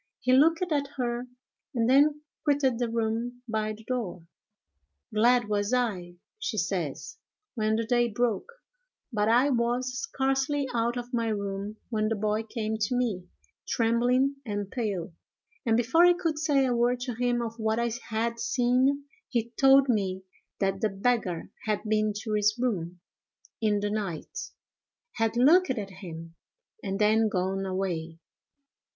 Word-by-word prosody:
He 255 -1 +2
looked 325 +6 +5
at 285 -2 +1
her, 240 -1 -2 0.5
and 230 -1 +2
then 290 +3 +4 0.2
quitted 275 -4 +2
the 240 -2 0
room 230 +2 -2
by 215 -1 -1
the 220 +1 -13
door. 215 -9 -4 0.9
"Glad 240 +2 +4
was 205 +3 +1
I," 190 -8 -1 0.2
she 460 0 -3
says, - - -3 0.3
"when 220 -2 +1
the 230 +1 -1
day 240 0 +2
broke; 235 - -1 0.6
but 210 0 +2
I 250 +5 +4
was 245 +1 0
scarcely 270 -6 0
out 235 +1 0
of 245 +1 -6
my 230 -1 +1
room 200 0 -3
when 215 -1 +1
the 225 - 0
boy 215 +1 0
came 220 -1 -3
to 215 +4 0
me, 215 -8 -1 0.4
trembling 245 +4 +2
and 205 -4 -4
pale, 200 -9 -3 0.5
and, 225 0 +4
before 260 +9 +4
I 355 0 +7
could 330 -4 -2
say 290 -4 +3
a 250 -2 +1
word 240 +1 +2
to 245 -1 -3
him 245 +1 0
of 230 0 -6
what 220 0 0
I 235 0 0 0.2
had 230 +1 -1
seen, 260 +4 +2 0.2
he 235 -2 -1
told 270 +2 +5
me 190 -5 0 0.4
that 195 0 0
the 215 - +2
beggar 195 -4 -1 0.2
had 210 -2 0
been 215 -1 +1
to 220 - -3
his 210 +1 +2
room 180 -8 -2 0.6
in 210 -2 +2
the 205 0 -1
night, 200 -7 -4 0.7
had 225 0 0
looked 335 +9 +5
at 210 -6 -2
him, 165 -3 -9 0.5
and 195 -1 -2
then 215 +1 +3
gone 190 0 -1
away. 175 -4 -3
230 Hz, 155 wpm, -28 LUFS, 210-250 Hz, 0.9 s, I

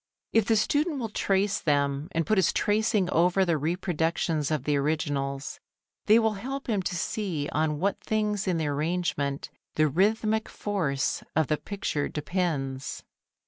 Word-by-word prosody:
If 225 -2 +4
the 225 - +4
student 290 +8 +1
will 230 -4 -3
trace 200 -1 +1
them 140 0 0
and 165 -1 0
put 215 -2 +3
his 185 - +3
tracing 210 -2 +2
over 180 +3 +3
the 170 -2 +2
reproductions 160 -1 0
of 155 -4 -1
the 150 +1 +1
originals, 140 -2 -1 0.5
they 215 +1 +7
will 220 -1 +3
help 265 +7 -5
him 210 -5 0
to 180 - -3
see 170 -5 -2
on 155 0 0
what 195 +3 0
things 210 -2 -1
in 180 -2 +1
the 160 - -1
arrangement 145 -1 -1 0.2
the 155 0 +4
rhythmic 215 - +1
force 160 -11 -1
of 160 0 +3
the 155 - +2
picture 195 -7 -3
depends. 150 -5 -2
175 Hz, 155 wpm, -27 LUFS, 150-210 Hz, 0.5 s, they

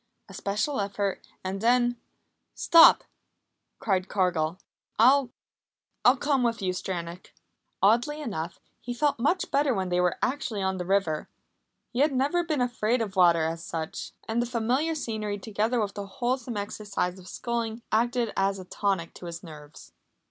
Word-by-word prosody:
A 195 - -13
special 210 +9 -1
effort 200 0 -2 0.2
and 190 +1 -4
then: 240 +1 +3 0.6
"Stop!" 335 -1 +7 0.7
cried 190 -3 0
Cargill. 175 -4 0 0.4
"I 260 +3 +5 0.7
I'll 250 +2 +6
come 280 -1 +1
with 235 -1 +1
you, 185 -2 -1
Stranack." 175 -1 -5 0.5
Oddly 240 +9 +3
enough, 175 - -5 0.2
he 245 +1 -5
felt 285 0 +1
much 335 +9 +1
better 280 -3 +2
when 190 -2 -2
they 180 0 +2
were 180 -1 +1
actually 250 -6 -1
on 190 0 0
the 180 -1 -4
river. 190 -6 0 0.6
He 245 - -3
had 290 +1 +3
never 285 +7 +1
been 310 -5 -1
afraid 240 -1 +1
of 210 -4 -3
water, 170 -3 +5
as 165 +1 -3
such. 160 -1 -5
And 225 +2 0
the 240 - -1
familiar 250 +7 0
scenery, 215 -7 -3
together 220 +4 -1
with 205 -2 -1
the 200 -1 -6
wholesome 245 +2 -2
exercise 200 -3 -3
of 185 - -14
sculling, 230 +1 -3
acted 235 0 +1
as 195 0 +1
a 185 - -9
tonic 190 -3 -1
to 175 - -9
his 170 +1 -7
nerves. 150 -3 -12
215 Hz, 160 wpm, -27 LUFS, 185-245 Hz, 0.7 s, Stop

